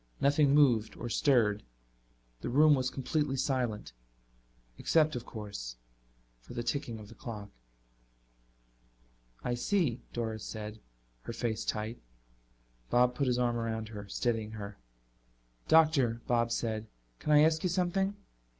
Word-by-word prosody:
Nothing 145 0 +4
moved 120 -7 +4
or 120 - -5
stirred. 110 -6 +3 0.8
The - - -4
room 150 +4 +6
was 130 -2 +1
completely 140 +1 -1
silent, 125 - -1 0.9
except, 155 -2 +3
of 120 - -5
course, 100 - -6 0.6
for - - -12
the 120 - -2
ticking 120 -3 -2
of 105 -1 -10
the - - -12
clock. 105 -4 -8 1.9
"I 125 - 0
see," 130 - +1
Doris 110 -2 -3
said, 110 0 -6 0.4
her 115 - -6
face 115 -2 -2
tight. 110 +2 -3 0.9
Bob 125 0 +4
put 140 +1 0
his 125 -1 +2
arm 120 -1 +1
around 110 -1 -3
her, 105 -2 -8
steadying 110 +1 -1
her. 100 -2 -7 0.9
"Doctor," 145 -8 +4
Bob 120 -1 +1
said, 110 -2 -2 0.3
"can 150 - -1
I 150 0 +8
ask 160 0 +4
you 180 - +1
something?" 190 +3 +1
120 Hz, 130 wpm, -31 LUFS, 110-145 Hz, 1.9 s, I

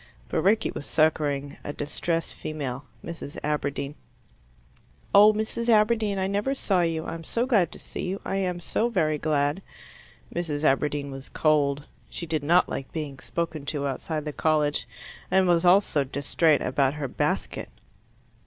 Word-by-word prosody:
But - - 0
Rickie 215 +3 +3
was 145 - -7
succouring 145 -3 +1
a 145 - -4
distressed 165 +3 -2
female 140 -4 -5 0.2
Mrs. 165 -3 -7
Aberdeen. 145 -1 -2 1.2
"Oh, 210 +2 +9
Mrs. 220 +2 -2
Aberdeen, 215 -2 +3
I 190 - 0
never 205 +8 0
saw 195 -8 +2
you: 165 -1 -1
I - - -4
am 165 0 -7
so 235 +8 0
glad 200 - +3
to - - -7
see - - -5
you 190 +2 -2
I 195 - -1
am 180 -2 -1
so 225 +6 0
very 155 -8 +1
glad." 145 +2 +1 0.7
Mrs. 155 -4 -2
Aberdeen 145 0 +1
was 135 0 -8
cold. 145 -2 +2 0.2
She 170 - -4
did 160 -2 -1
not 170 +5 +4
like 135 - -5
being 145 -4 -5
spoken 165 -3 -3
to 145 -1 -2
outside 150 +3 -3
the 150 - -4
college, 150 -1 +1 0.4
and 190 0 +4
was 175 0 +3
also 175 -5 +4
distrait 145 +2 +2
about 135 +2 +1
her 145 -2 -3
basket. - - -2
155 Hz, 160 wpm, -26 LUFS, 145-185 Hz, 1.2 s, Oh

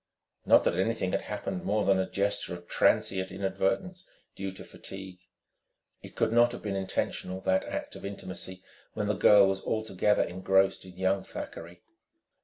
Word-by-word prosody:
Not - - +7
that 85 - +1
anything 95 -2 0
had - - 0
happened 95 -3 -4
more 105 +1 +1
than 95 -1 +4
a 95 - -1
gesture 100 -2 -1
of 85 0 -12
transient 95 -1 +2
inadvertence 100 - -1 0.3
due 95 0 -4
to - - -9
fatigue. 95 -1 -9 0.8
It - - -12
could 110 - +1
not 120 +1 +5
have - - -8
been 100 -2 -2
intentional, 95 -1 -2
that 95 0 +1
act - - -5
of - - -10
intimacy, 95 -2 -7 0.3
when 105 - -1
the 105 - +1
girl 100 0 +7
was 95 0 0
altogether 105 -2 +1
engrossed 95 +2 +1
in 90 -1 -13
young 95 +1 +1
Thackeray. 85 +1 -8
95 Hz, 165 wpm, -29 LUFS, 95-105 Hz, 0.8 s, Not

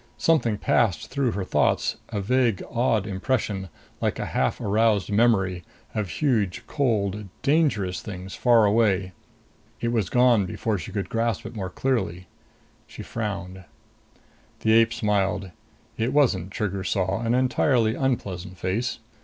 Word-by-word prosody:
Something 120 -10 +2
passed 105 -5 +1
through 135 -5 0
her 100 - -2
thoughts, - - +1
a 105 -3 -2
vague 120 -1 +1
odd 115 -4 +1
impression, 100 -2 -2 0.3
like - - 0
a - - -3
half - - 0
aroused 105 0 +1
memory, 100 -5 +2 0.3
of 105 -4 -2
huge, 105 - 0
cold, 105 -7 0 0.2
dangerous 135 - +1
things 95 -1 -7
far 120 -3 +4
away. 100 -3 +2 0.7
It 115 - -1
was 110 -7 0
gone 120 -6 +4
before 105 +2 -2
she 80 - -7
could 100 -2 -3
grasp 115 -3 -1
it 115 +1 -8
more 95 -3 -4
clearly. 95 -9 -1 0.6
She - - -9
frowned. 100 -4 -5 1.0
The 110 - +2
ape 115 0 +5
smiled. 100 -4 0 0.5
It 115 +4 0
wasn't, 105 - +2
Trigger 100 -1 -3
saw, 95 +3 0
an 115 +1 +1
entirely 125 -2 +2
unpleasant 95 -9 -2
face. 100 +8 -2
105 Hz, 135 wpm, -25 LUFS, 95-120 Hz, 1.0 s, ape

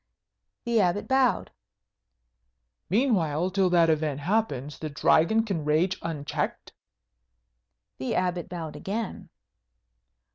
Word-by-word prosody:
The 235 -2 +2
Abbot 180 +2 0
bowed. 265 -2 +2 1.4
"Meanwhile, 185 - +1
till 190 -1 +2
that 170 -2 +4
event 150 -2 -1
happen, 150 - 0
the 155 - -4
Dragon 165 +8 +3
can 195 -8 -3
rage 160 +5 +1
unchecked?" 150 -4 -4 1.3
The 130 - -2
Abbot 180 -1 -1
bowed 165 -3 -6
again. 215 +2 -5
175 Hz, 100 wpm, -27 LUFS, 155-205 Hz, 1.4 s, that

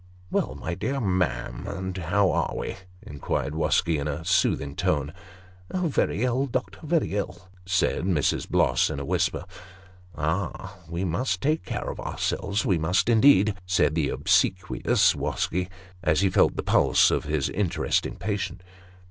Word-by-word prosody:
" 90 0 -25
Well, - - 0
my 90 - -4
dear 130 +10 -2
ma'am, 90 - -1
and 95 0 -4
how 95 +2 +1
are - - -1
we? - - -4 0.2
" 90 - -25
inquired 70 -1 -3
Wosky, 80 0 +1
in 70 - -3
a 75 +2 -4
soothing 70 -5 +1
tone. 75 0 0 0.4
" 90 +1 -26
Very 165 - 0
ill, 130 +2 +1
doctor 125 0 -3
very 160 - 0
ill," 90 -3 -4 0.2
said 95 -2 +1
Mrs. 85 -7 0
Bloss, - - +3
in 70 - -4
a 70 - -5
whisper. - - 0 0.4
" 90 -1 -24
Ah! 85 +5 -2 0.2
we 85 +3 -2
must 90 +2 -1
take 155 +8 0
cafe - - -4
of - - -5
ourselves; 100 +2 -2
we 90 -4 +2
must, 90 +6 +1
indeed," 110 -3 +5
said 90 -4 +2
the 75 -3 0
obsequious 90 -1 +2
Wosky, 90 +1 -2 0.3
as 80 -1 +2
he 95 -2 +2
felt - - +3
the - - -3
pulse - - +4
of - - 0
his 75 -2 0
interesting 95 -4 0
patient. 95 -2 -3
90 Hz, 165 wpm, -26 LUFS, 80-100 Hz, 0.4 s, indeed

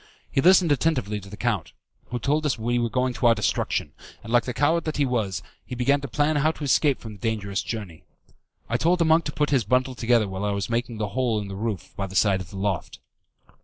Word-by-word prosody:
He 135 - +2
listened 180 -1 +5
attentively 130 -8 +1
to 95 -1 -12
the 105 - -9
count, 110 -8 -1 0.3
who 125 - -3
told 145 +6 0
us 140 - 0
we 120 +2 0
were 120 -1 0
going 125 +2 0
to 120 - +1
our 115 - +5
destruction, 110 - -1 0.3
and 115 - -6
like 120 -1 +4
the 125 - -2
coward 160 +4 +2
that 155 - -3
he 145 - +3
was, 100 -9 -1 0.2
he 125 - -7
began 140 +4 +2
to 140 - -5
plan 150 +4 +1
how 150 +2 +3
to 155 - -8
escape 140 0 +2
from 110 -2 -9
the 100 - -14
dangerous 100 -2 -2
journey. 100 -8 -6 0.6
I 120 - 0
told 170 +8 +2
the 170 - +2
monk 160 0 +4
to 150 - -2
put 150 0 0
his 130 -5 +3
bundle 125 +5 +1
together 120 -3 +2
while 95 +1 -5
I 105 0 0
was 100 +2 -3
making 120 0 -1
the 105 -1 -2
hole 115 0 0
in 100 -1 -6
the 95 - -6
roof 105 -3 -4
by 95 - -3
the 95 - -10
side 95 -1 +3
of 90 - -9
the 95 - -9
loft. 95 -3 -2
120 Hz, 250 wpm, -25 LUFS, 105-140 Hz, 0.6 s, listened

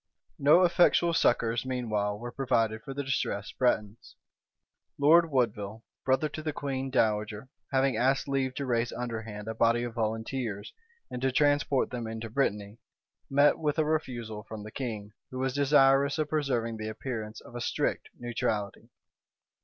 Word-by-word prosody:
No 150 +6 +6
effectual 175 -1 +4
succors, 115 -7 +2
meanwhile, 110 -6 -1
were 120 +3 -7
provided 115 -5 0
for 145 - -8
the 140 +1 -3
distressed 110 -6 -3
Bretons. 110 -4 0 0.8
Lord 165 +4 +5
Woodville, 110 -5 -1 0.2
brother 135 +3 +2
to 155 - -6
the 155 0 -2
queen 135 -2 -3
dowager, 105 -1 0 0.2
having 135 -3 +2
asked 135 +4 +2
leave 135 -2 -1
to 140 - -3
raise 120 -2 0
underhand 110 -3 -5
a 110 - -2
body 115 +1 +2
of 120 -1 -4
volunteers, 110 -1 -3 0.4
and 125 - -5
to 130 0 +1
transport 145 -1 +2
them 120 -2 -4
into 110 0 -6
Brittany, 105 -4 -1 0.5
met 145 +2 +4
with 150 -1 0
a 155 - +2
refusal 120 -8 -2
from 110 0 -8
the 110 - -9
king, 110 -5 -5 0.2
who 130 - -7
was 130 0 -1
desirous 140 0 +4
of 155 -1 -1
preserving 125 -7 -1
the 110 0 -4
appearance 110 -1 -5
of - - -15
a 120 - -5
strict - - -1
neutrality. 110 -4 -3
120 Hz, 155 wpm, -29 LUFS, 110-135 Hz, 0.8 s, No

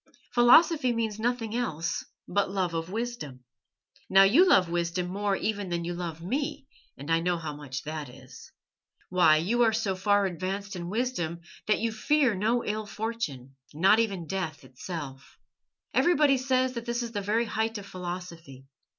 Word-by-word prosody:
Philosophy 255 +3 +5
means 220 -2 -2
nothing 230 -1 -1
else 165 -9 -2 0.2
but 200 -1 0
love 185 -3 -1
of 165 +1 -3
wisdom. 215 - -5 0.7
Now 195 0 +7
you 270 - +6
love 185 - +5
wisdom 170 +1 -1
more 200 +1 0
even 205 -2 -2
than 170 -1 -2
you 175 - -3
love 170 -2 -5
me, 270 - -3 0.3
and 140 +4 -6
I 165 - +4
know 175 +1 0
how 155 -3 -5
much 140 -3 -6
that 155 -2 -5
is. 125 - -14 0.6
Why, 175 -4 +5
you 210 +10 +1
are 230 -2 +5
so 215 -3 0
far 205 +1 +2
advanced 190 +2 -4
in 175 -1 -5
wisdom 190 -7 -2 0.3
that 215 - +3
you 230 0 0
fear 260 +3 +2
no 220 +5 0
ill 215 0 -3
fortune, 180 - -5 0.2
not 190 +7 +5
even 195 -7 -1
death 165 -5 -4
itself. 135 +1 -8 0.6
Everybody 300 -5 +4
says 255 0 +1
that 235 -1 -5
this 240 +1 -1
is 235 - -5
the 205 -3 -3
very 215 +4 +1
height 225 0 -2
of 200 - -8
philosophy. 175 -7 -8
195 Hz, 170 wpm, -28 LUFS, 170-230 Hz, 0.7 s, Now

